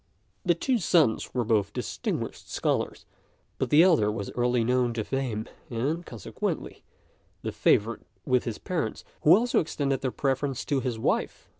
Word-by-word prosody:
The 175 -2 +3
two 250 +7 +1
sons 165 - +2
were 125 - +2
both 105 -3 +1
distinguished - - -4
scholars, - - -1 0.5
but - - 0
the 150 +3 +7
elder 155 - +4
was 105 -2 -4
early 120 -1 +1
known 125 0 +1
to 110 - -1
fame, 120 -4 -2 0.2
and, 140 +8 -1
consequently, 115 - -5 0.6
the - - -2
favourite 115 +3 +2 0.2
with 125 -1 +2
his 115 -3 -3
parents, 180 -3 -3 0.2
who 160 +4 +7
also 240 +2 +2
extended 140 -4 -1
their 130 - 0
preference 135 0 -1
to 140 - +1
his 125 -3 -2
wife. 110 - -1
130 Hz, 155 wpm, -27 LUFS, 115-150 Hz, 0.6 s, the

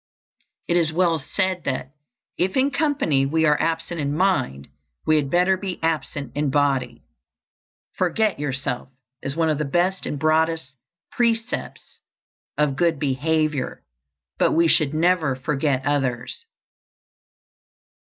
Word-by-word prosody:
It 175 - +2
is 165 -2 +2
well 165 -1 +2
said 185 +5 -1
that 130 -1 -2 0.4
"if 185 +5 0
in 270 +2 +3
company 275 - +1
we 160 +3 +2
are 150 -1 +3
absent 165 0 -2
in 145 +1 -1
mind, 160 - 0 0.4
we 155 - +4
had 140 -2 0
better 180 +3 +3
be 190 -2 -4
absent 150 -5 -2
in 145 0 0
body." 135 -4 0 0.9
"Forget 195 +2 0
yourself" 135 -3 -3 0.3
is 135 - -4
one 165 -1 +2
of 150 - -1
the - - +1
best 175 +6 0
and 145 - -3
broadest 160 -1 +1 0.4
precepts 235 +2 -2 0.6
of 150 -2 +1
good 170 -1 +2
behavior; 150 0 -1 0.6
but - - +3
we 165 +1 +4
should 155 -2 +2
never 165 -4 +2
forget 135 0 -1
others. 135 - -1
155 Hz, 130 wpm, -23 LUFS, 140-175 Hz, 0.9 s, we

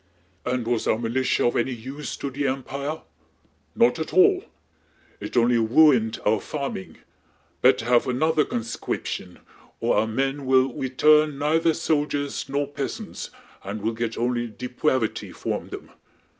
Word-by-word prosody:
"And 125 -2 -1
was 120 -1 0
our - - +3
militia 120 +3 0
of 120 - +2
any 125 +2 0
use 135 +6 -6
to 140 - -4
the 140 +2 -2
Empia? 140 +3 -4 0.7
Not 125 +6 +3
at 160 - -4
all! 375 0 +5 0.8
It - - -5
only 120 0 +4
wuined 115 -1 +4
our 105 0 +3
farming! 140 -10 -5 0.6
Bettah - - +4
have 120 0 +3
another 155 +5 +2
conscwiption... 115 -6 -4 0.4
o' - - +2
ou' 110 - -1
men 135 +4 -2
will 130 0 +4
wetu'n 150 +3 +3
neithah 160 +2 +2
soldiers 145 -3 -1
no' 140 +1 0
peasants, 140 -1 -5 0.3
and 100 +2 -6
we'll 115 +1 0
get 115 0 -3
only 120 0 0
depwavity 125 +1 -2
fwom - - -4
them. - - -9
130 Hz, 140 wpm, -24 LUFS, 120-145 Hz, 0.8 s, all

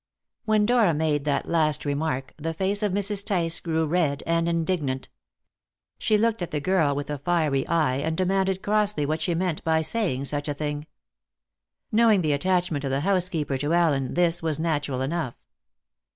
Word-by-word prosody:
When 215 -1 +3
Dora 225 -8 +3
made 150 -2 0
that 140 -2 0
last 155 -3 +1
remark, 145 -2 -2
the 165 +1 -4
face 195 +4 0
of 210 -2 +1
Mrs. 200 +1 0
Tice 170 -5 0
grew 160 -1 0
red 155 -3 0
and 165 0 +1
indignant. 160 -6 -1 0.9
She 215 - +2
looked 225 -1 +1
at 175 - -3
the 150 -3 -2
girl 155 -3 +2
with 145 +1 -4
a 145 - -3
fiery 150 -4 0
eye, 155 -6 +1
and 160 +3 -2
demanded 190 0 0
crossly 210 -6 +1
what 155 +2 -1
she 170 +1 0
meant 175 -2 -1
by 160 0 +2
saying 160 - -1
such 145 +1 -3
a 145 - -2
thing. 150 0 -4 1.0
Knowing 220 -4 +4
the 150 -2 +2
attachment 175 -1 0
of 135 - -1
the 135 +1 0
housekeeper 170 -7 0
to 145 +4 -1
Allen, 145 -7 +1
this 175 -1 +2
was 160 -3 -1
natural 145 -5 -1
enough. 135 -2 -2
160 Hz, 175 wpm, -25 LUFS, 145-185 Hz, 1.0 s, Knowing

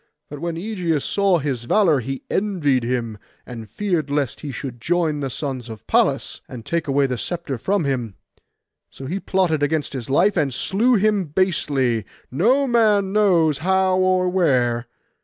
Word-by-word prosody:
But 145 - -7
when 170 +1 -3
Ægeus 170 -5 -2
saw 200 -3 +2
his 135 -6 -3
valour, 165 - +3
he 135 +2 -5
envied 165 - 0
him, 115 -3 -2 0.3
and 115 -4 -9
feared 170 - -2
lest 145 -3 -2
he 145 - -5
should 125 -1 -7
join 165 -1 0
the 135 -2 -3
sons 130 -3 -5
of 110 -2 -10
Pallas, - - +1
and 115 -3 -9
take 170 -2 -2
away 140 0 +2
the 125 -3 -2
sceptre 170 -8 -4
from 195 - 0
him. 120 -7 -2 0.7
So 135 - -10
he 180 +9 -3
plotted 180 -6 0
against 145 0 -1
his 130 -3 -6
life, 180 +9 +3
and 150 -6 +1
slew 220 - +1
him 210 -2 +2
basely, 145 - 0 0.3
no 240 - +3
man 210 -6 +2
knows 170 -8 +3
how 190 +1 +2
or 185 0 +2
where. 125 -10 +1
155 Hz, 165 wpm, -21 LUFS, 130-190 Hz, 0.7 s, valour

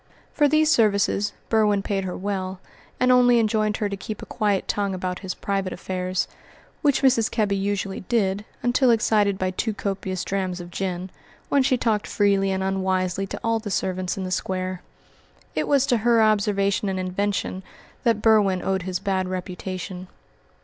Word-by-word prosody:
For 295 - +4
these 310 +1 +3
services 205 -3 +2 0.2
Berwin 210 -3 +2
paid 195 -2 -1
her 180 - -4
well, 190 -1 -3 0.4
and 255 0 +4
only 245 -1 +6
enjoined 215 -1 +1
her 210 - 0
to 200 - -3
keep 210 +2 -7
a - - -6
quiet 205 -4 0
tongue 200 -2 -1
about 180 0 -3
his 190 -2 -5
private 195 -2 -2
affairs, 185 0 -2 0.5
which 285 -3 +2
Mrs. 245 -4 +4
Kebby 210 -3 0
usually 195 0 -2
did 200 -1 0 0.2
until 245 +1 +3
excited 215 -3 +3
by 185 -1 -1
too 215 +3 -2
copious 190 -3 -3
drams 185 -2 -2
of 175 0 -9
gin, 185 0 -3 0.4
when 280 - +4
she 260 -1 +2
talked 220 -3 0
freely 200 -1 +2
and 190 0 -1
unwisely 190 0 0
to - - -6
all 230 0 +1
the 215 -1 -6
servants 185 -1 -1
in 190 - -3
the 185 - -4
Square. 185 0 -2 0.7
It - - -1
was 275 -2 +3
to 245 -3 +2
her 230 +1 +3
observation 205 -2 +2
and 190 -1 -2
invention 185 0 -2 0.4
that 230 -4 +1
Berwin 205 -5 +4
owed 190 -1 0
his 185 0 -2
bad 190 0 -1
reputation. 185 0 -5
200 Hz, 170 wpm, -24 LUFS, 185-220 Hz, 0.7 s, only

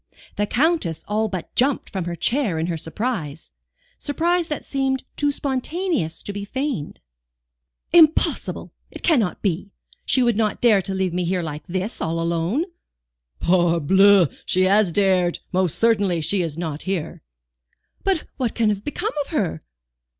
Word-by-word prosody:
The 205 - 0
Countess 245 - 0
all 215 +1 0
but 185 -3 -6
jumped 265 +2 +1
from 190 -3 -3
her 175 0 -3
chair 225 - 0
in 160 - 0
her 170 -1 -2
surprise 165 - -4 0.5
surprise 335 +3 0
that 300 - -4
seemed 265 -1 -1
too 290 0 +1
spontaneous 280 - -2
to 205 - -5
be 200 0 -5
feigned. 260 - -3 0.9
"Impossible! 320 -2 +3 0.2
it - - -11
cannot 245 - +2
be. 195 0 -1 0.3
She 260 - +3
would 235 -2 +2
not 215 -1 0
dare 220 -5 +5
to 190 +1 -4
leave 190 -2 -1
me 180 0 0
here 180 0 -1
like 150 -1 -6
this, 190 +5 -3
all 165 +1 -1
alone." 170 - 0 0.7
"Parbleu! 175 +1 +4
she 185 - +1
has 195 0 +4
dared. 185 -2 +2
Most 185 -3 +1
certainly 205 -6 +2
she 170 +5 0
is 165 -3 -3
not 160 -3 -4
here." 170 -5 -3 0.8
"But 380 -5 +1
what 245 -4 -1
can 225 -2 +2
have 205 -1 -2
become 410 +9 -3
of 280 - -5
her?" 190 - -1
200 Hz, 155 wpm, -22 LUFS, 170-260 Hz, 0.9 s, dare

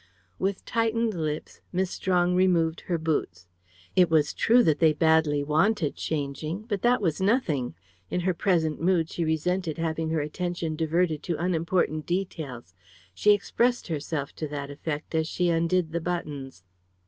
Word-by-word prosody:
With 195 0 -2
tightened 230 -1 0
lips 155 -3 -4
Miss 185 0 0
Strong 180 -2 +1
removed 175 -3 +2
her 175 - +1
boots. 150 - -2 0.5
It 180 -2 +5
was 155 -2 +3
true 240 +2 +4
that 155 -6 +2
they 160 -2 +5
badly 160 -2 +3
wanted 155 +2 +1
changing. 155 +5 -3
But 205 -4 -3
that 240 -2 +3
was 165 -1 0
nothing. 185 - +1 0.3
In 180 - -1
her 185 +1 +1
present 165 -4 +1
mood 170 -2 +2
she 170 - -2
resented 160 +1 -1
having 160 -1 -1
her 160 -1 0
attention 165 +1 -3
diverted 160 0 0
to 170 -1 -2
unimportant 165 -2 0
details. 155 - -4 0.4
She 210 - +5
expressed 240 +3 0
herself 150 -2 -3
to 155 - -3
that 145 -1 -5
effect 150 +2 -5
as 160 -1 +1
she 175 +1 0
undid 170 0 +1
the 170 +1 -2
buttons. 145 - -4
165 Hz, 155 wpm, -27 LUFS, 155-185 Hz, 0.5 s, It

